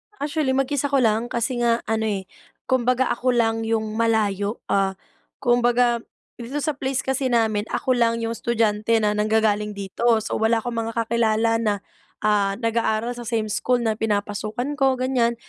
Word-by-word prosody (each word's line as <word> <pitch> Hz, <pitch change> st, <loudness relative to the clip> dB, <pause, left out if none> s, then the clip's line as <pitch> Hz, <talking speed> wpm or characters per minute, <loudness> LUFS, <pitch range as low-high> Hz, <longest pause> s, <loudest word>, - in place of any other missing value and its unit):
Actually 290 Hz, -4 st, -1 dB
mag-isa 270 Hz, +1 st, 0 dB
ko 275 Hz, -2 st, +2 dB
lang, 225 Hz, +1 st, +2 dB
kasi 240 Hz, +1 st, -2 dB
nga 235 Hz, -1 st, +1 dB
ano 220 Hz, 0 st, -1 dB
eh, 200 Hz, -3 st, -2 dB, 0.4 s
kumbaga 255 Hz, 0 st, +2 dB
ako 250 Hz, +1 st, 0 dB
lang 225 Hz, -1 st, +1 dB
'yong 220 Hz, -1 st, -1 dB
malayo, 215 Hz, -2 st, +1 dB
ah, 195 Hz, -1 st, +1 dB, 0.5 s
kumbaga 240 Hz, -1 st, +3 dB, 0.4 s
dito 255 Hz, +5 st, -4 dB
sa 295 Hz, -1 st, -2 dB
place 270 Hz, -1 st, -1 dB
kasi 265 Hz, 0 st, 0 dB
namin 220 Hz, -3 st, +1 dB
ako 260 Hz, -, -1 dB
lang 230 Hz, -1 st, +2 dB
'yong 225 Hz, -, -1 dB
estudyante 225 Hz, -1 st, +1 dB
na 210 Hz, -, +3 dB
nanggagaling 210 Hz, -1 st, +1 dB
dito. 200 Hz, +4 st, -3 dB, 0.2 s
So -, -, -3 dB
wala 225 Hz, +1 st, +2 dB
akong 240 Hz, -1 st, -4 dB
mga 230 Hz, -, -5 dB
kakilala 225 Hz, 0 st, +1 dB
na, 215 Hz, -2 st, +1 dB, 0.5 s
ah, 205 Hz, -2 st, +2 dB
nag-aaral 230 Hz, 0 st, 0 dB
sa 240 Hz, -1 st, -8 dB
same 220 Hz, -2 st, -1 dB
school 245 Hz, +3 st, +1 dB
na 220 Hz, -1 st, +1 dB
pinapasukan 215 Hz, +4 st, -2 dB
ko, 270 Hz, -1 st, +3 dB
ganyan. 250 Hz, -2 st, +1 dB
230 Hz, 165 wpm, -23 LUFS, 215-245 Hz, 0.5 s, kumbaga